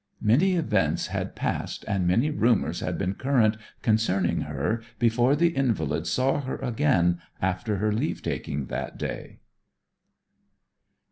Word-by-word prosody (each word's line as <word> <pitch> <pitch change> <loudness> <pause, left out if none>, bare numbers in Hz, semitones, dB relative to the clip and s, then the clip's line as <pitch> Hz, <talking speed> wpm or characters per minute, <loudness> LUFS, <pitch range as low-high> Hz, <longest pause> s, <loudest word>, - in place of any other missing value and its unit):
Many 150 - +4
events 165 -3 +1
had - - -3
passed - - -3
and 100 -4 0
many 115 +12 +2
rumours 120 -6 +1
had - - -3
been 95 0 -1
current 120 -2 +2 0.3
concerning 100 -5 +2
her 75 +11 -2 0.2
before 120 +4 +3
the 170 +3 +3
invalid 90 - 0
saw 135 +7 +1
her 130 -1 -4
again 115 - +1 0.2
after 95 +4 -1
her 105 +2 +1
leave 115 +9 -2
taking 70 -1 -3
that - - -5
day. - - -5
110 Hz, 130 wpm, -26 LUFS, 95-135 Hz, 0.3 s, Many